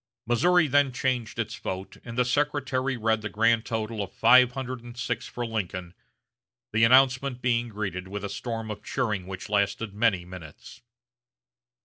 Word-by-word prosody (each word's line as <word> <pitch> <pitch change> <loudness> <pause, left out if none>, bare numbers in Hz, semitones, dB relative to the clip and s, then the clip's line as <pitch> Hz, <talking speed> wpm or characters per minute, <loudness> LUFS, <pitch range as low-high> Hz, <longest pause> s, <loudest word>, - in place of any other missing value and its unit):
Missouri 165 +9 +4
then 145 -1 +3
changed 125 -2 -2
its - - -3
vote, 95 +1 -6
and 115 0 -8
the 125 - +3
secretary 135 -1 0
read 110 -1 +1
the 105 - -4
grand 115 +1 +2
total 110 -1 -3
of 100 - -5
five 125 +2 +5
hundred 130 -2 -5
and 120 0 -11
six 120 -1 -3
for 120 - -4
Lincoln; 90 -6 -4 0.8
the 110 +1 +3
announcement 130 +1 +4
being 120 -1 +1
greeted 95 -4 -4
with 100 +1 -6
a - - -2
storm 115 -1 -4
of 105 - -7
cheering 105 -8 -2
which 95 -1 -7
lasted 105 +1 0
many 100 -5 +1
minutes. 90 -4 -11
115 Hz, 160 wpm, -27 LUFS, 105-125 Hz, 0.8 s, five